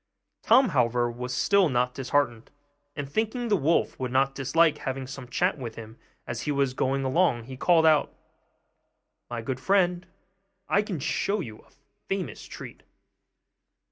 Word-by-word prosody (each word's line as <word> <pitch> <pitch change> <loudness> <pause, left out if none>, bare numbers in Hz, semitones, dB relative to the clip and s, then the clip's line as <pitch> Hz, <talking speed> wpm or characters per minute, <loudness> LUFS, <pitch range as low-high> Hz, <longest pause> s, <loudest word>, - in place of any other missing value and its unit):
Tom, 260 -2 +5
however, 120 -4 +1
was 125 +1 -6
still 190 +7 +3
not 125 -1 +1
disheartened; 130 -3 -1 0.5
and 145 -1 -4
thinking 220 - -2
the 210 - +4
wolf 165 -1 +1
would 130 -1 -3
not 135 +1 +2
dislike 150 +4 +2
having 130 0 -4
some 130 -1 -8
chat 175 +6 0
with 115 -4 -6
him 110 0 -10 0.3
as 120 -1 -4
he 145 - -2
was 140 -2 +1
going 135 +1 0
along, 135 -3 +2
he 130 +3 -9
called 160 +4 +3
out, 155 -2 +4 1.2
'My 120 -1 -4
good 130 +2 -3
friend, 180 +1 +1 0.6
I 200 - +3
can 205 -6 -4
show 200 +9 -1
you 110 - -7
a - - -22 0.4
famous 195 -2 -4
treat. - - -10
135 Hz, 155 wpm, -26 LUFS, 125-175 Hz, 1.2 s, Tom